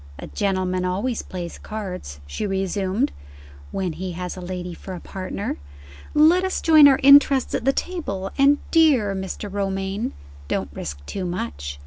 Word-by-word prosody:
"A - - -7
gentleman 185 -2 -1
always 200 +7 -1
plays 175 -2 -7
cards," 185 - -6
she 70 - -4
resumed, 195 +5 0 0.6
"when 185 -3 -2
he 180 +3 -5
has 180 +1 -5
a 185 - -8
lady 180 0 -5
for 185 +2 -8
a - - -7
partner. 190 +2 -5 0.6
Let 325 +5 +6
us 375 - -1
join 310 -3 +7
our 270 -2 +5
interests 280 -1 +6
at - - -2
the 270 - +5
table 200 - -3
and, 280 +1 +5
dear 280 -12 +4
Mr. 190 +2 -5
Romayne, 195 +3 -2 0.3
don't - - -2
risk 70 0 -7
too 190 - -4
much!" 70 - -4
195 Hz, 155 wpm, -23 LUFS, 180-260 Hz, 0.6 s, join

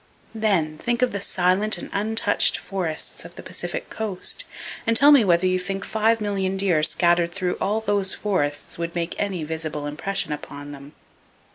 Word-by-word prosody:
Then, 185 -9 +1
think 240 +1 0
of 250 - +2
the 200 - -3
silent 190 +3 +2
and - - -7
untouched 210 0 +2
forests 175 -5 -4
of - - -12
the - - -9
Pacific - - -5
Coast 220 - -2 0.4
and 230 0 +6
tell 285 +3 +7
me 280 -5 +7
whether 175 -2 +3
you 185 0 +2
think 195 +2 -3
five 220 +1 +2
million 195 -2 -1
deer 185 -5 +2
scattered 170 +1 +3
through 180 -2 -1
all 215 +3 0
those 200 -3 0
forests 145 -8 -2
would 170 0 -4
make 170 0 -2
any 190 -5 -1
visible 155 -1 -4
impression 155 +5 -2
upon 145 -1 -7
them. 140 0 -11
190 Hz, 170 wpm, -23 LUFS, 165-210 Hz, 0.4 s, tell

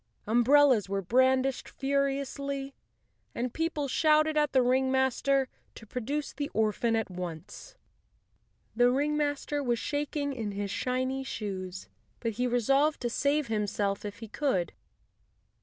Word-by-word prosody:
Umbrellas 245 -1 +4
were 195 0 -1
brandished 260 +5 +2
furiously, 275 0 -2 0.6
and 245 0 -2
people 320 -3 -1
shouted 310 +2 +3
at 300 -2 +2
the 260 -2 +4
ringmaster 265 +1 +2 0.3
to 225 - -11
pro¬ 250 +3 -5
duce 290 +5 -3
the 285 +1 -3
orphan 220 +1 +1
at 225 -3 -1
once. 180 - -7 1.0
The 245 +1 +5
ringmaster 290 +1 0
was 240 -3 0
shak¬ 290 +4 -3
ing 285 -1 -1
in 220 -5 -4
his 200 0 -3
shiny 260 +1 -1
shoes, 190 -7 -5 0.3
but 230 - -1
he 245 +4 -1
resolved 270 +5 +2
to 240 -1 -1
save 290 +4 +1
himself 205 -3 -1
if 205 -1 -6
he 225 - -6
could. 205 - -1
260 Hz, 135 wpm, -29 LUFS, 220-280 Hz, 1.0 s, The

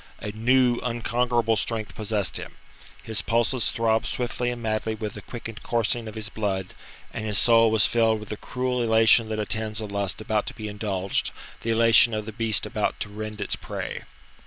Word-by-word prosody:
A 105 - -5
new, 120 +3 +3
unconquerable 120 -1 0
strength 110 +1 -2
possessed 105 -7 -1
him; - - -8 0.5
his 110 -2 -1
pulses 120 +3 +1
throbbed 115 -1 +1
swiftly 120 0 -2
and 120 0 -4
madly 110 -1 -1
with 105 -1 -5
the - - -8
quickened 115 -2 -8
coursing 115 0 0
of 110 - -8
his 110 -1 -2
blood, 100 -4 -3 0.4
and - - -4
his 105 -2 +1
soul 115 0 +5
was 110 -1 +5
filled 115 -2 +2
with 105 - -10
the - - -3
cruel 125 +1 -2
elation 110 0 +4
that 110 -1 -2
attends 110 +1 -2
a 110 - -4
lust 100 -2 -2
about 110 -1 -1
to - - -5
be 110 - -6
indulged 100 -2 -1 0.3
the 115 - -4
elation 115 0 +5
of 105 -1 -3
the 110 - -6
beast 110 -1 +1
about - - -2
to 105 - -2
rend 110 +1 -6
its 100 - 0
prey. - - -5
110 Hz, 190 wpm, -25 LUFS, 105-115 Hz, 0.5 s, soul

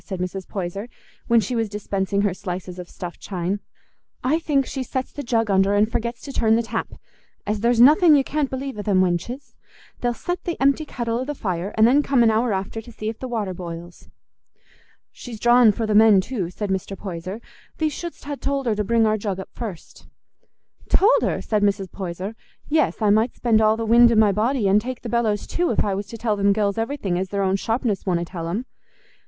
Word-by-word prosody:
said 190 -2 -6
Mrs. 180 +1 -4
Poyser, 195 +4 -5 0.4
when 235 0 +5
she 225 +4 -2
was 225 -2 0
dispensing 200 -1 -1
her 200 -3 +1
slices 180 0 -6
of 180 - -8
stuffed 175 -1 -8
chine. 185 +1 -3 0.6
"I 300 +6 +2
think 285 -5 +1
she 265 - -4
sets 260 0 -3
the 290 - -6
jug 230 -5 0
under 195 +1 +3
and 210 +2 +2
forgets 235 +1 -3
to 280 - -7
turn 220 -3 +3
the 235 - +1
tap, 225 0 -3 0.6
as 210 0 -1
there's 235 +2 +2
nothing 305 +6 +7
you 275 - +4
can't 290 0 -1
believe 265 -3 -5
o' - - -1
them 200 -2 +2
wenches: 185 +10 -2 0.5
they'll 240 -1 -1
set 355 +7 -4
the 345 - -3
empty 280 +3 +2
kettle 235 -4 -3
o' - - -1
the 295 +2 -4
fire, 185 -4 -3
and 220 - +6
then 265 +5 +5
come 275 -4 +3
an 225 - +5
hour 225 +2 +1
after 195 +3 -3
to 240 - -13
see 215 -1 -4
if 225 - -7
the 260 - -5
water 215 -6 -2
boils." 170 -1 -9 1.0
"She's 235 -3 -9
drawin' 240 0 +6
for 225 +2 -3
the 215 - 0
men 215 -2 +7
too," 190 -3 -3
said 200 +2 -4
Mr. 190 +1 -3
Poyser. 185 +1 -6 0.4
"Thee 315 - +1
shouldst 340 +1 -7
ha' 285 -1 -5
told 275 -1 -2
her 230 - +2
to 210 0 -1
bring 230 +2 +2
our 215 0 +2
jug 200 -2 -3
up 190 - -7
first." 205 -8 -8 0.8
"Told 425 +6 +4
her?" - - -1
said 215 -2 0
Mrs. 200 -2 0
Poyser. 185 +2 -5 0.3
"Yes, 305 -6 +1
I 210 - +4
might 220 +4 +2
spend 225 -3 +2
all 215 0 +3
the 225 - -2
wind 235 +1 +6
i' - - +2
my 215 -2 +5
body, 220 +2 +1
an' 195 +2 +5
take 250 +3 -6
the 235 - -5
bellows 225 -3 0
too, 350 0 -1
if 225 - +1
I 200 - 0
was 200 +1 -4
to 230 - -8
tell 220 -1 0
them 200 0 +3
gells 205 0 0
everything 225 -7 -2
as 190 0 -3
their 200 0 -1
own 190 0 +2
sharpness 225 0 -1
wonna 175 -2 +1
tell 170 -2 -6
'em. 205 +9 -3
215 Hz, 225 wpm, -22 LUFS, 195-245 Hz, 1.0 s, nothing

